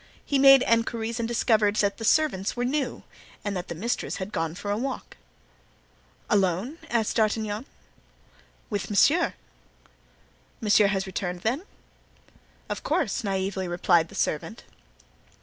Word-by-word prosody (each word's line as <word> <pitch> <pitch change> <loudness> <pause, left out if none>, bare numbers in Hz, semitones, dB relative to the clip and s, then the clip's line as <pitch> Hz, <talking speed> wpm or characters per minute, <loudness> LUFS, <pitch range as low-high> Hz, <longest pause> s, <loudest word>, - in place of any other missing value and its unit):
He 280 - +1
made 270 -1 +8
inquiries 230 0 0
and 230 - -1
discovered 220 -3 +2
that 200 -1 +1
the - - -5
servants 220 -7 +2
were 245 - 0
new 270 -1 -2 0.4
and 205 -1 -2
that 180 0 -4
the 170 - -5
mistress 230 +9 -2
had 190 +2 -5
gone 165 -2 -2
for 205 +3 -4
a - - +1
walk. 260 +4 -4 1.1
"Alone?" 205 - 0
asked 230 -3 0
D'Artagnan. 215 +1 0 1.0
"With 205 -1 -2
monsieur." 305 - +3 1.2
"Monsieur 210 -1 +4
has 195 -1 -1
returned, 180 -2 -4
then?" 260 - -1 1.0
"Of - - -4
course," - - -1
naively 190 -1 -2
replied 175 -1 +2
the - - -12
servant. 215 +9 -2
210 Hz, 130 wpm, -26 LUFS, 190-240 Hz, 1.2 s, made